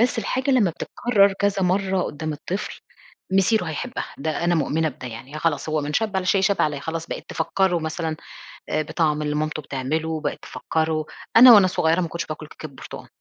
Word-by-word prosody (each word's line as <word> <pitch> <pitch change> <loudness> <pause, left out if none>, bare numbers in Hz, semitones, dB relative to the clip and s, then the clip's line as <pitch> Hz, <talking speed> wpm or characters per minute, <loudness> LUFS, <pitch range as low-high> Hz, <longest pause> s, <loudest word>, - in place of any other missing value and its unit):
بس 245 0 +2
الحاجة 260 +4 -1
لمّا 235 -9 +4
بتتكرر 200 +4 +2
كذا 195 0 0
مَرّة 190 0 +1
قدام 155 0 -4
الطفل 180 +7 -5 0.5
مصيره 195 +2 +3
هيحبها، 180 - -4
ده 155 +3 -2
أنا 175 0 +3
مؤمنة 160 +1 +1
بده 130 -3 -8
يعني، 125 +6 -8
خلاص 155 -2 -1
هو 155 0 0
من 145 0 -4
"شبّ 215 +3 0
على 190 - 0
شيء 195 +1 +3
شاب 195 +1 +2
عليه"، 150 -2 0
خلاص 165 +2 -4
بقيت - - -6
تفكره 190 -3 +1
مثلًا 160 0 -3 0.5
آآ، - - +1
بطعم 155 -1 0
اللي 150 0 -1
مامته 155 0 -2
بتعمله، 155 +4 -3
بقِت - - -3
تفكره 160 -1 -2 0.3
أنا 245 +1 +11
وأنا 200 -4 +7
صغيّرة 165 -1 +1
ما 170 - -1
كنتش 170 +1 -4
باكل 155 0 -7
كيكة 155 - -9
برتقان 135 -3 -10
160 Hz, 190 wpm, -23 LUFS, 155-195 Hz, 0.5 s, أنا